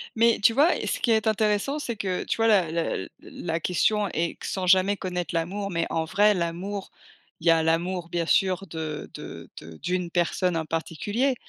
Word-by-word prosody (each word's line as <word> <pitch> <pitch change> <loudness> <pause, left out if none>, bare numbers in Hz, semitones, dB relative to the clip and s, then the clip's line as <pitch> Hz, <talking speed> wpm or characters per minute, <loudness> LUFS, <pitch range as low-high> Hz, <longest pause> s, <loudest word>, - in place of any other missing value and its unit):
Mais 230 +1 +4
tu 225 - +6
vois, 295 +7 +4
heu, - - -4
ce - - -1
qui 235 - +1
est 220 -1 +2
intéressant, 215 +6 +1
c'est 235 -5 -3
que, 190 -3 -2
tu - - -2
vois, 225 0 +3
la 185 -7 +4
la 165 0 0
l 95 - -5
la 165 -1 -4
question 205 +5 +1
est 170 +1 -2
q - - -8
sans 185 -1 -2
jamais 190 +2 +4
connaître 180 -3 -4
l'amour, 195 +5 -2
mais 170 -1 0
en 160 -1 -1
vrai 205 +5 +4
l'amour, 185 +3 -3 0.5
il 170 - -3
y - - +8
a 165 -1 +3
l'amour 170 +2 0
bien 170 -1 -1
sûr 190 +1 +2
de 155 -2 -5
de - - -9
de 80 0 -11
d'une 180 +1 -2
personne 175 0 0
en 160 - -2
particulier, 205 - -1
180 Hz, 210 wpm, -26 LUFS, 165-205 Hz, 0.5 s, y